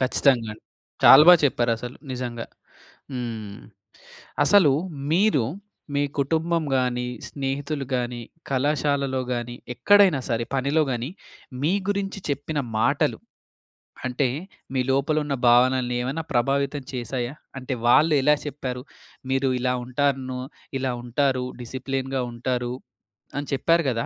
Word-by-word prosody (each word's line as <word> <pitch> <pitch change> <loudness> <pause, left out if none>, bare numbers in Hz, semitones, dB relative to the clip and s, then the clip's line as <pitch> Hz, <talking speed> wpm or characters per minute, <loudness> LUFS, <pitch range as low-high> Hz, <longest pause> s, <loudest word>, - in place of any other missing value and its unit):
ఖచ్చితంగా 130 -3 +2
అండి. 105 - -15 0.4
చాలా 140 +3 +10
బాగా 175 -2 +9
చెప్పారసలు 120 -2 0 0.2
నిజంగా. 120 -2 -4 0.7
హ్మ్. 110 -5 -5 0.9
అసలు 190 -9 +6 0.4
మీరు 180 - +3 0.5
మీ 145 - +2 0.2
కుటుంబం 160 +4 +1
గాని, 125 -1 0 0.2
స్నేహితులు 140 +1 -3
గాని, 120 -1 -1 0.3
కళాశాలలో 140 -1 0
గాని 120 0 -4 0.2
ఎక్కడైనా 190 +2 +5
సరే 115 0 0
పనిలో 140 +4 +2
కాని, 120 +3 -2 0.5
మీ 155 +5 +2 0.2
గురించి 200 0 -2
చెప్పిన 145 +2 -2 0.2
మాటలు. - - +1 0.9
అంటే 130 +2 +1 0.5
మీ 130 - +1
లోపల 140 +3 +1
ఉన్న 140 -2 -2
భావనని 125 +1 +4
ఏమైనా 140 +6 -3
ప్రభావితం 140 +3 +1
చేశాయా? 125 0 -3 0.3
అంటే 130 0 -4
వాళ్ళు 155 +6 +5
ఎలా 150 +2 +5
చెప్పారు? 130 -3 -4 0.5
మీరు 135 0 +1
ఇలా 125 0 +1
ఉంటారనో, 130 -1 -1 0.4
ఇలా 130 -1 -1
ఉంటారు 130 +1 0 0.2
డిసిప్లిన్‌గా 130 +2 -3
ఉంటారు 125 0 -2 0.6
అని 145 - -4
చెప్పారు 165 +5 +3
కదా! 115 -1 -2
130 Hz, 115 wpm, -24 LUFS, 125-145 Hz, 0.9 s, చాలా